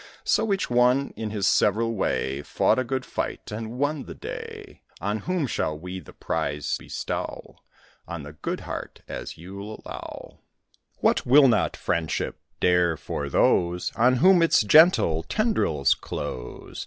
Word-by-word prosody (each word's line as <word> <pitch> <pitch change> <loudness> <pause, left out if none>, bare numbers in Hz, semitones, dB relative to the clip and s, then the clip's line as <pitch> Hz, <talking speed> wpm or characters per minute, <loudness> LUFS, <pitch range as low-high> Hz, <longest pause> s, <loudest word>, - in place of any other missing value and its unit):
So 220 - +2
each 195 - 0
one, 125 +3 +3
in 110 -1 -4
his 105 -2 -2
several 115 +4 +3
way, 70 -9 -1
Fought 75 - +1
a - - +1
good 130 +1 -3
fight, - - -4
and 110 +3 -5
won 145 +1 -1
the - - -9
day. 455 -3 -8 0.2
On 105 +1 -2
whom 180 0 -1
shall 80 - -2
we 90 +3 -6
the - - -13
prize 75 -1 -2
bestow? - - -5 0.5
On 85 -3 -6
the 75 +1 -9
good 75 - -4
heart, - - -7
as - - -6
you'll 100 +5 -9
allow. - - -9 0.6
What - - +2
will 135 +2 +7
not 120 - +1
friendship 80 -2 -2 0.2
dare 90 -2 +3
for 70 -1 -4
those 85 +5 +2
On 125 +3 +4
whom 180 +7 +5
its 165 -8 +4
gentle 130 - +5
tendrils 80 - +1
close? 60 -1 -7
110 Hz, 150 wpm, -25 LUFS, -, 0.6 s, will